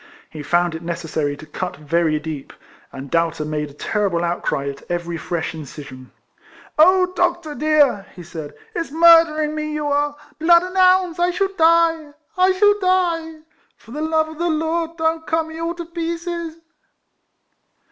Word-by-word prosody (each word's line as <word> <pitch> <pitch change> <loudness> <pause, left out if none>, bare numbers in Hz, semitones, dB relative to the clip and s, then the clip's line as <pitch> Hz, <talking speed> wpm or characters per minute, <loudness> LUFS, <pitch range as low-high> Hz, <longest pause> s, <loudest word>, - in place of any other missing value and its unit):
He 155 - -7
found 175 +2 +1
it 160 - -6
necessary 160 -4 -3
to 155 - -11
cut 165 +1 -5
very 155 +1 0
deep, 150 -2 -7 0.4
and 135 0 -9
Doubter 165 -2 0
made 150 -1 -3
a - - -15
terrible 190 0 -1
outcry 170 -5 -2
at 140 0 -8
every 175 -1 -3
fresh 165 0 -3
in 160 - -7
cision. 130 -3 -10 0.4
" - - -21
Oh, 365 +2 +5
doctor 345 -3 0
dear! 295 -9 +2
" - - -23
he 175 - -10
said, 160 -3 -8 0.2
"it's 335 -7 -3
mur 330 +2 +7
dering 305 -1 -3
me 305 0 -3
you 300 -1 -3
are! 290 0 0 0.2
Blood 340 +2 +5
an' 365 +1 -7
'ounds! 370 -2 +4
I 350 0 +3
shall 385 +2 -1
die! 330 -2 +3
— - - -42
I 380 - +4
shall 410 +2 +3
die! 340 -4 0 0.4
For 225 - -17
the 295 +4 -5
love 315 0 +1
of 315 0 -11
the 345 0 0
Lord 325 +1 -1
don't 320 0 -1
cut 325 +1 +1
me 320 0 -9
all 335 +1 -2
to 340 -1 -6
pieces 335 0 -4
310 Hz, 180 wpm, -20 LUFS, -, 0.4 s, mur